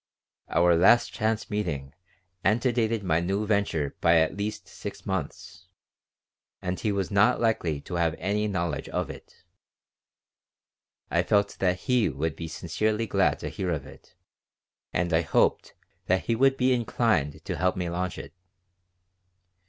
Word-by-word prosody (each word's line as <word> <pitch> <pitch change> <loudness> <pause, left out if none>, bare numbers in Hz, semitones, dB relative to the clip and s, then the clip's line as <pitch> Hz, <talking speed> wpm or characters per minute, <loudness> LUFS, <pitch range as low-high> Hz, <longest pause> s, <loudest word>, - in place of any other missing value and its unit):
Our 85 0 +4
last 110 +8 +5
chance 110 0 -1
meeting 75 -10 -3 0.5
antedated 115 0 +1
my 80 -3 +2
new 95 +5 -1
venture 100 -9 0
by 85 0 +5
at 80 +1 +2
least 105 0 -4
six - - -8
months, 90 - -5 0.9
and 90 0 -3
he 105 - 0
was 100 -1 -2
not 100 +1 +4
likely 90 -10 0
to 90 - -9
have 80 -2 +1
any 105 +2 -1
knowledge 85 -5 -2
of - - -2
it. - - -15 1.7
I 85 +4 +3
felt 100 +3 +1
that 90 -1 +1
he 125 -6 +2
would 75 +3 -2
be 80 0 -6
sincerely 105 +8 -1
glad 95 -8 +2
to - - -3
hear 95 - -3
of 80 -5 -2
it - - -16 0.8
and 85 0 -1
I 80 - +4
hoped 80 - +1 0.3
that 95 +1 +2
he 115 - +1
would 135 +3 +3
be 130 0 +3
inclined 115 - 0
to - - -3
help 90 0 +1
me 90 -1 -2
launch 90 +2 -3
it. - - -9
95 Hz, 150 wpm, -27 LUFS, 85-110 Hz, 1.7 s, last